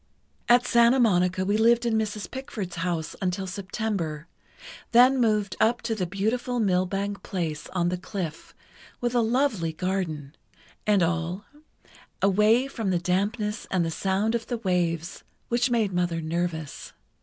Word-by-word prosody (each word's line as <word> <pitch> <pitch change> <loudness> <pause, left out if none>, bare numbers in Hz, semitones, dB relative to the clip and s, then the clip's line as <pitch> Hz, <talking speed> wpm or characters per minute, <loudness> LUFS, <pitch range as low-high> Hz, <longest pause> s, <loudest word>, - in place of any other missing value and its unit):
"At 245 +1 +6
Santa 235 +2 +5
Monica 185 -4 +2
we 205 +2 +2
lived 235 +2 +4
in 235 - +1
Mrs. 215 -1 -2
Pickford's 215 -9 -6
house 165 -2 -2
until 185 +1 -1
September, 185 -5 -3 0.7
then 255 +3 +6
moved 210 -4 +1
up 235 +2 +2
to 230 -1 -1
the 190 -5 -2
beautiful 225 +6 -1
Millbank 195 0 0
place 165 -5 -4
on 175 -2 0
the 180 0 -2
cliff, 180 -5 -6 0.4
with 240 0 -1
a 240 - +3
lovely 225 - +1
garden, 160 -5 -3 0.5
and 205 -4 +4
all, 170 +4 -1 0.7
away 210 +6 +4
from 225 -7 -3
the 180 - +2
dampness 205 +5 -1
and 180 -3 +1
the 165 - -2
sound 195 +6 0
of 235 -1 -2
the 240 - -2
waves, 175 -5 -1 0.3
which 240 +2 +2
made 225 -5 +1
Mother 175 -2 0
nervous. 160 -2 -3
195 Hz, 145 wpm, -26 LUFS, 175-225 Hz, 0.7 s, At